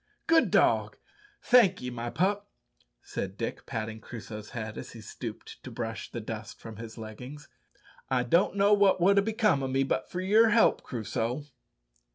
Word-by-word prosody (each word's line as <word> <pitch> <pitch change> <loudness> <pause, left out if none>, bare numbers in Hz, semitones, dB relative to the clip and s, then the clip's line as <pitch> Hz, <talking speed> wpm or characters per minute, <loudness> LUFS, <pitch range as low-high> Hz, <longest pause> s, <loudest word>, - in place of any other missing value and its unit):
"Good 330 -1 +4
dog; - - +2 0.5
thank'ee, 190 - +4
my 120 0 -4
pup," 200 +7 0 0.5
said 95 +1 -5
Dick, 115 - -5
patting 110 -1 -4
Crusoe's 110 -2 -8
head 110 -2 -6
as - - -9
he - - -10
stooped - - -8
to - - -7
brush 115 -3 -5
the 120 - -5
dust 110 -1 -7
from 110 -2 -10
his 115 0 -9
leggings. 125 +7 -9 0.6
"I 130 -2 +2
don't 170 +11 +2
know 200 +1 +4
what 200 -2 +4
would 200 +3 +5
ha' - - +2
become 210 - +2
o' 135 - -1
me 135 +1 +1
but 130 -1 -2
for 180 - -4
your 215 +5 +5
help, 225 +1 +4
Crusoe." 120 +3 -3
130 Hz, 170 wpm, -29 LUFS, -, 0.6 s, would